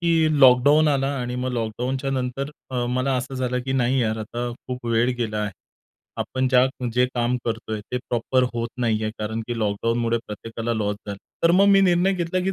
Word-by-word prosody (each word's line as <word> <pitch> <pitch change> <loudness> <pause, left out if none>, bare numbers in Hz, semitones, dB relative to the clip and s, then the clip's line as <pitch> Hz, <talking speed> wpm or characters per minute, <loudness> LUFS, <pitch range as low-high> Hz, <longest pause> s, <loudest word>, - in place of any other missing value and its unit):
की 160 -3 +2
लॉकडाउन 140 +4 +6
आला 135 -2 +1
आणि 125 0 -3
मग 125 0 -2
लॉकडाउनच्या 125 +4 -2
नंतर 130 +2 -2 0.2
अ, 125 -2 -1
मला 130 +2 0
असं 125 +2 -4
झालं 125 -1 -1
की 130 - -1
नाही 130 0 +2
यार, 110 -1 -1
आता 120 +3 -4 0.2
खूप 125 -1 -5
वेळ 115 +2 +2
गेला 110 -3 -2
आहे. 105 -1 -2 0.6
आपण 130 0 -1
ज्या 125 0 +5 0.3
जे 125 +1 +3
काम 120 0 +1
करतोय 110 -2 -3
ते - - +1
प्रॉपर 125 +2 +1
होत 115 0 -2
नाहीये, 110 -2 0
कारण 110 +1 -3
की 120 -1 -3
लॉकडाउनमुळे 115 +2 0
प्रत्येकाला 115 +2 -4
लॉस 105 -2 -1
झाला. 100 -1 -4 0.3
तर 170 - +6
मग 195 +3 +5
मी 195 -1 +6
निर्णय 185 0 +3
घेतला, 180 0 -1
की 190 - 0
125 Hz, 190 wpm, -23 LUFS, 115-135 Hz, 0.6 s, लॉकडाउन